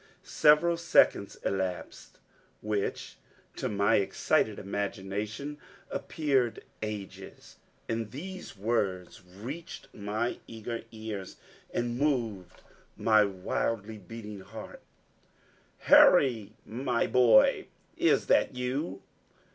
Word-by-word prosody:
Several 160 +3 +4
seconds 165 -11 +3
elapsed, 95 -2 -3 0.5
which 105 -2 -3 0.4
to - - -3
my 100 +2 +3
excited 100 +1 +1
imagination, 105 +7 -4 0.3
appeared 135 -7 0 0.2
ages; 105 -3 -7 0.3
and 115 -1 -2
these 180 - -8
words 100 -5 -1
reached 120 - -8
my 110 +3 -2
eager 115 +1 -6
ears, 110 -4 -7 0.3
and 120 0 -2
moved 115 -11 -1 0.3
my 110 -1 +5
wildly 100 +3 -3
beating 105 +1 -9
heart: 105 +4 -10 1.0
"Harry, 115 -7 +6
my 120 +2 -1
boy, 120 -4 +5 0.3
is - - +3
that - - +3
you?" 125 +6 -3
110 Hz, 90 wpm, -29 LUFS, 100-125 Hz, 1.0 s, Harry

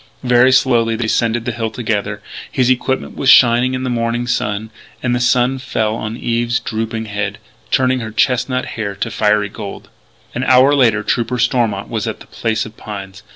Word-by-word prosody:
Very 125 +1 +5
slowly 120 -3 +3
they 120 - -3
descended 115 +1 0
the - - -1
hill 115 -1 -3
together. 105 -3 -3 0.3
His 130 -1 +2
equipment 130 +1 -1
was 135 - +1
shining 125 +1 +5
in 130 - -3
the 130 - -2
morning 115 0 -1
sun: 110 -2 -2 0.3
and 120 -1 +1
the 120 - +1
sun 125 +2 +2
fell 110 -4 -1
on 110 0 -5
Eve's 120 +1 0
drooping 110 0 -3
head, 105 -1 -3 0.3
turning 130 0 +2
her 110 -2 -5
chestnut 125 +3 0
hair 100 -3 -4
to 115 - -3
fiery 105 -2 +1
gold. 105 -1 -8 0.4
An 125 - -2
hour 130 +2 +5
later 115 -7 +3
Trooper 120 +2 -1
Stormont 115 -5 0
was 115 -1 -3
at 110 - -4
the - - -13
Place 110 -1 -2
of 110 0 -11
Pines. 100 -2 -8
115 Hz, 185 wpm, -17 LUFS, 110-125 Hz, 0.4 s, Very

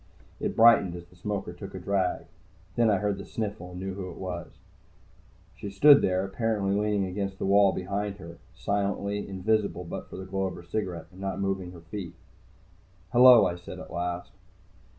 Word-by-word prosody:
It - - -2
brightened 110 -6 +6
as 85 0 -8
the 90 - -22
smoker 95 0 -4
took 95 +2 -9
a - - -5
drag. 95 0 -1 0.5
Then 115 -2 +4
I 100 - +3
heard 100 0 -1
the - - -6
sniffle, 105 -4 -5
and 90 0 -8
knew 95 0 -4
who 95 -1 -6
it 85 - -10
was. 90 -3 -5 1.0
She 105 - -6
stood 140 +9 +7
there, 95 +1 +1
apparently 100 -1 0
leaning 105 -1 +1
against 95 +1 -3
the - - -3
wall 100 0 +5
behind 100 +2 -3
her, 85 -3 -11 0.2
silently, 100 0 -2
invisible 100 -1 0
but 85 - -7
for - - -9
the 95 - -7
glow 95 +1 -2
of 95 - -3
her - - -10
cigarette, 90 -2 -4
and 95 +1 -13
not 95 -1 -3
moving 95 -2 -2
her 85 - -12
feet. 85 +1 -7 1.0
"Hello," 125 -1 +8
I 90 - 0
said 90 - -9
at - - -10
last. 90 0 -3
95 Hz, 190 wpm, -28 LUFS, 90-105 Hz, 1.0 s, Hello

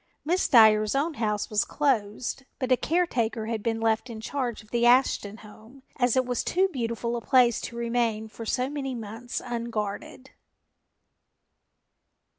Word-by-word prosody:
Miss 355 +4 +1
Dyer's 215 -1 +5
own 305 +4 0
house 210 -6 -2
was 210 -1 +2
closed, 255 -2 -1
but 255 -2 -3
a - - +7
caretaker 245 -9 0
had 225 -1 -3
been 225 +1 -1
left 225 +2 0
in 225 -2 -7
charge 240 -1 -3
of 215 - -23
the 235 0 0
Ashton 240 -4 +3
home, 220 +5 -16
as 245 0 +2
it 255 - +3
was 245 -1 -1
too 375 +2 +2
beautiful 235 - -3
a 235 - -3
place 245 -2 +3
to 235 - -7
remain 235 -2 -1
for 225 +1 -9
so 250 +3 -1
many 270 -2 -4
months 225 +2 -6
unguarded. 235 +1 -5
235 Hz, 155 wpm, -26 LUFS, 220-255 Hz, -, a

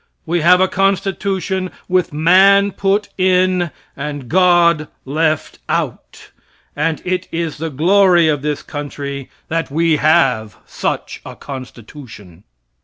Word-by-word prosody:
We 170 +1 0
have 180 +3 +5
a 190 - +3
constitution 195 -1 -1 0.2
with 180 -1 +1
man 190 +6 +4
put 200 +2 0
in 185 -1 +2 0.3
and 145 -3 -6
God 175 -4 +3 0.2
left 155 +2 -1
out; - - -4 0.4
and 155 +1 -1
it 185 0 -2
is 165 -3 -3
the 165 +1 -3
glory 175 +3 +4
of 150 -3 0
this 150 0 -3
country 140 -2 -6 0.2
that 165 +1 -2
we 160 +2 +1
have 135 -9 +2
such - - -4
a - - -10
constitution. 120 - -11
165 Hz, 120 wpm, -17 LUFS, 145-185 Hz, 0.4 s, have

